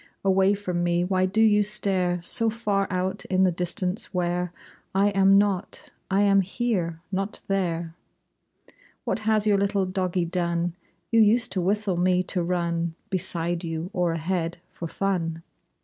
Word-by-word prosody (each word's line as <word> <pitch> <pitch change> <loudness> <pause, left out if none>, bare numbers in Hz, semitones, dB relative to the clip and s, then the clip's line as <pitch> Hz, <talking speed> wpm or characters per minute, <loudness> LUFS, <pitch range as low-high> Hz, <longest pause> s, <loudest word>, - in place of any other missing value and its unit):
Away 195 +1 +3
from 180 -4 -3
me 175 0 +1
why 185 0 +1
do 220 +4 0
you 210 -2 +5
stare 190 -4 +2
So 225 +5 +6
far 205 -3 -1
out 185 +2 -2
in 185 0 +1
the 185 - +3
distance 180 +4 -2
where 180 -1 -1 0.4
I 200 +1 +4
am 195 0 +4
not? 200 -2 -1 0.2
I 195 +1 +2
am 195 -1 +4
here! 185 -5 -2
Not 195 +2 -3
there! 170 -4 -1 1.1
What - - -1
has 215 -1 +3
your 205 -2 +3
little 200 -1 +1
doggie 185 -1 -1
done? 170 0 -1 0.4
You 230 - +4
used 225 +1 +3
to 185 -1 -1
whistle 200 0 0
me 180 +1 +2
to 185 - -2
run 170 -1 -1 0.2
Beside 175 -2 -2
you, 165 +2 -4
or 180 -3 +1
ahead, 165 +1 -2
for 170 - -6
fun! 165 -3 -2
185 Hz, 155 wpm, -25 LUFS, 175-200 Hz, 1.1 s, So